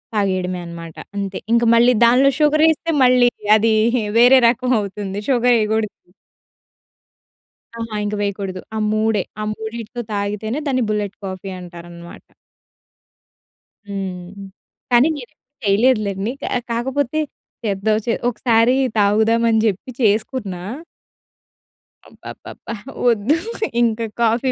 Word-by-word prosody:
తాగేయడమేననమాట 180 -4 -3 0.2
అంతే. 195 -1 -3
ఇంక 235 0 +4
మళ్ళీ 240 +2 +5
దానిలో 255 +4 +5
షుగర్ 305 0 +3
ఎస్తే 330 +1 -3
మళ్ళీ 250 -1 +5 0.3
అది 220 +1 +2 0.4
వేరే 250 +3 +7
రకం 250 +1 -1
అవుతుంది. 200 -1 -5
షుగర్ 245 -2 +3
ఎయకూడదు. 215 -4 -2 1.7
అహా! 230 -1 -5
ఇంక 210 0 -2
వేయకూడదు. 195 -2 -3
ఆ - - -2
మూడే! 215 -1 +1 0.2
ఆ - - -2
మూడిటితో 225 +2 -6
తాగితేనే 210 +5 -2
దాన్ని 255 -3 +1
బుల్లెట్ 210 -1 -2
కాఫీ 190 0 -6
అంటారన్నమాట. 170 -1 -11 1.6
హ్మ్. 190 -2 -5 0.6
కానీ 245 +4 +5
నేనయితే 250 -5 -10 0.3
చేయలేదు 220 +4 +3
లెండి. 200 +3 -2
కా - - -2 0.2
కాకపోతే 265 +5 -1 0.4
చేద్దాం 215 0 0
చే 230 - +1 0.2
ఒకసారీ 235 0 +2 0.2
తాగుదామని 220 +2 +3
జెప్పి 210 +4 -2
చేసుకున్నా. 210 -3 0 1.5
అబ్బబ్బబ్బా! - - -10 0.4
ఒద్దు. 230 +6 +2 0.5
ఇంకా 230 -1 +1 0.2
కాఫీ 235 +3 +2
220 Hz, 105 wpm, -19 LUFS, 200-240 Hz, 1.7 s, వేరే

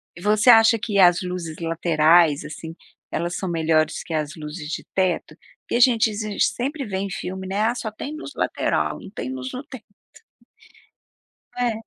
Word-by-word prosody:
E 175 - -11
você 210 +4 +3
acha 225 0 +7
que 205 -2 -1
as 175 -1 +6
luzes 180 -3 -5
laterais 165 -2 +3
assim, 160 +1 -8 0.4
elas 175 +1 -2
são 190 - -3
melhores 160 -1 +1
que 165 - -7
as 155 -1 -2
luzes 150 0 -7
de - - -4
teto? 185 -2 0 0.3
Porque - - -4
a - - +2
gente 235 -3 +4 0.3
sempre 275 +2 0
vê 190 -2 -4
em 195 +1 -3
filme, 190 +1 -5
né. 200 +2 -1
"Ah, 230 +2 +1
só 220 -3 -4
tem 280 +8 -7
luz 305 -2 -8
lateral, - - -1
não - - -11
tem 130 - -5
luz 130 0 -5
no 255 - -5
teto." 260 -7 -11 1.7
Não 245 - +1
é? 230 - 0
185 Hz, 180 wpm, -23 LUFS, 160-225 Hz, 1.7 s, acha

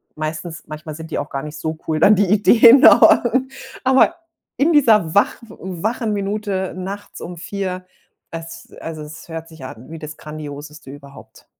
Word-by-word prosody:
Meistens 155 +1 -5
manchmal 155 0 -8
sind 160 +1 -10
die - - -2
auch 145 - -5
gar 135 0 -5
nicht 150 0 -8
so 160 0 -4
cool 155 -1 0
dann 210 +6 +6
die 205 +1 +2
Ideen 230 +5 +6
aber - - +7 0.6
aber 265 +5 +4 0.4
in 310 +4 +3
dieser 220 - +4
wach 200 - +3
wachen 210 +6 -4
Minute 200 -2 -3
nachts 195 +2 -7
um 175 - -7
4, 185 0 -5 0.5
es 165 0 -9
also, 160 -1 -7
es 155 +1 -11
hört 165 -1 -7
sich 160 -5 -11
an 125 0 -11
wie 165 - -8
das 155 0 -8
Grandioseste 150 -1 -9
überhaupt. 140 0 -15
165 Hz, 165 wpm, -19 LUFS, 155-205 Hz, 0.6 s, aber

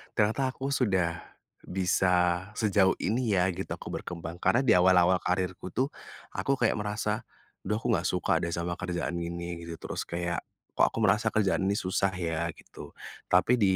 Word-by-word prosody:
ternyata 110 +6 +2
aku 135 +1 -4
sudah 95 -10 +1 0.5
bisa 90 -1 +2
sejauh 100 -3 +3
ini 115 -1 0
ya," 90 0 +3
gitu, 95 +2 -5
aku - - -6
berkembang. 85 0 -6
Karena 130 +3 +3
di 120 - +4
awal-awal 90 0 +5
karirku 90 0 -2
tuh 135 +2 +1 0.4
aku 135 - 0
kayak 120 -4 +1
merasa, 105 +1 -2 0.4
"Aduh 105 - +1
aku 115 - -1
enggak 85 -5 +1
suka 90 -2 +1
deh 85 0 -2
sama 85 0 -3
kerjaan 85 -1 -2
ini," 85 0 -4
gitu. 85 - -5
Terus - - -5
kayak, 85 -1 -2 0.3
"Kok - - +4
aku - - -6
merasa 110 +2 +3
kerjaan 100 -3 +1
ini 100 - +2
susah 95 0 0
ya," 85 -2 -1
gitu. - - -12 0.3
Tapi 115 +7 +4
di 95 -2 +4
95 Hz, 170 wpm, -29 LUFS, 85-105 Hz, 0.5 s, awal-awal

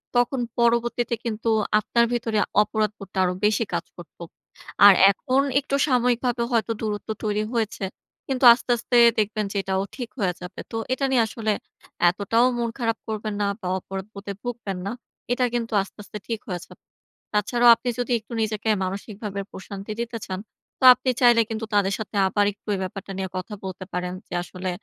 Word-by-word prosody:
তখন 245 +2 +2 0.2
পরবর্তীতে 235 0 +2
কিন্তু 225 0 -2 0.3
আপনার 235 +2 +2
ভেতরে 225 -3 0 0.2
অপরাধবোধটা 210 -2 -2
আরো 180 - +1
বেশি 215 +2 +3
কাজ - - -1
করতো। 175 0 -11 0.6
আর 205 - +11 0.2
এখন 260 +6 +1 0.2
একটু 280 0 -2
সাময়িকভাবে 245 -1 +1
হয়তো 230 -1 +1
দূরত্ব 210 -1 -3
তৈরি 210 0 0
হয়েছে। 225 -3 -2 0.4
কিন্তু 265 -1 -2
আস্তে, 245 +1 -3
আস্তে 240 +1 -2 0.2
দেখবেন 215 0 0
যে - - -9
এটাও 190 0 0
ঠিক 245 -4 -5
হয়ে 185 -4 +1
যাবে। 180 +1 -8
তো - - -5 0.2
এটা 275 +1 0
নিয়ে 240 -3 +4
আসলে 220 0 -2 0.6
এতটাও 210 +6 +2
মন 235 -1 -1
খারাপ 225 -2 0
করবেন 215 -1 -3
না - - +2 0.2
বা 185 - -4
অপরাধবোধে 200 +2 -7
ভুগবেন 235 -6 -4
না। - - -2 0.4
এটা 250 +1 +2
কিন্তু 230 -2 -2
আস্তে, 195 - -10
আস্তে 210 - -8
ঠিক 225 -2 -2
হয়ে 180 - -2
যাবে। - - -17 0.5
তাছাড়াও 235 +4 +3
আপনি 235 +2 -4
যদি 245 +1 -2
একটু 220 +2 -12
নিজেকে 220 0 -1
মানসিকভাবে 200 +1 -5
প্রশান্তি 195 +2 -8
দিতে 235 0 -4
চান, 185 -1 -4 0.4
তো - - -7
আপনি 255 +1 -3
চাইলে 240 -2 +6
কিন্তু 225 0 -3
তাদের 200 -1 +3
সাথে 215 0 -6
আবার 205 +2 +2
একটু 205 - -41
এই - - -4
ব্যাপারটা 195 +1 -6
নিয়ে 190 -1 -3
কথা 185 +4 -5
বলতে 185 0 -6
পারেন। 180 0 -2
যে - - -10
আসলে 185 +1 -5
215 Hz, 175 wpm, -24 LUFS, 195-235 Hz, 0.6 s, আর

